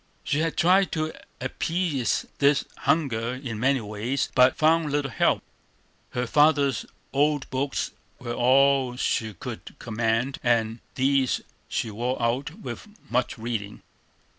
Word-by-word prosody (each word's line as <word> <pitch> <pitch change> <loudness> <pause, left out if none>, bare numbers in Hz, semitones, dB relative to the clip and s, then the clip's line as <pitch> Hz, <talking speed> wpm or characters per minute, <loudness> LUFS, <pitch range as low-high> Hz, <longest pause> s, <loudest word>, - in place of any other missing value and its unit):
She 145 - 0
had 165 0 -1
tried 185 +3 +4
to 155 -1 -1 0.3
appease 165 -7 -1
this 140 0 +4
hunger 125 -6 0
in 125 -5 -5
many 135 +1 +2
ways, 110 +6 -2
but 125 0 +5
found 160 -1 +3
little 145 -2 0
help. - - +2 0.7
Her 125 0 -1
father's 145 0 +3 0.3
old 145 0 +2
books 135 +2 -1 0.3
were 120 -2 -5
all 130 +1 +4
she 110 -3 -1
could - - -8
command, 115 +3 -1
and 115 -1 +1 0.2
these 135 0 +2 0.3
she 110 - -2
wore 120 +5 -2
out 120 +4 0
with - - -7 0.2
much 125 0 0
reading. 110 -3 -4
130 Hz, 130 wpm, -26 LUFS, 120-145 Hz, 0.7 s, but